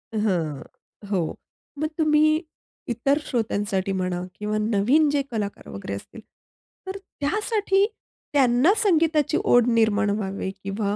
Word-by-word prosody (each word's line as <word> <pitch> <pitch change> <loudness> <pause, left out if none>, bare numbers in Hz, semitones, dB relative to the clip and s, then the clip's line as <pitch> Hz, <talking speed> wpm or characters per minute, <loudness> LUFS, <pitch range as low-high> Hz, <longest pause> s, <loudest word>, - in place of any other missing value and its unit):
हं, 175 -9 0 0.5
हो. 175 -5 0 0.4
मग 310 - 0
तुम्ही 310 0 +3 0.5
इतर 245 +5 +1
श्रोत्यांसाठी 205 -5 -1
म्हणा 180 -1 -2
किंवा 210 0 -2
नवीन 225 +8 +3
जे 285 -1 +1
कलाकार 210 -3 -4
वगैरे 100 0 -6
असतील, 215 - -10 0.7
तर 380 +1 -4 0.2
त्यासाठी 395 +4 +1 0.5
त्यांना 265 +5 +4
संगीताची 325 - +2
ओढ 245 -1 +4
निर्माण 220 -3 +3
व्हावी 195 -2 -3
किंवा 200 +1 -2
225 Hz, 115 wpm, -24 LUFS, 200-300 Hz, 0.7 s, त्यांना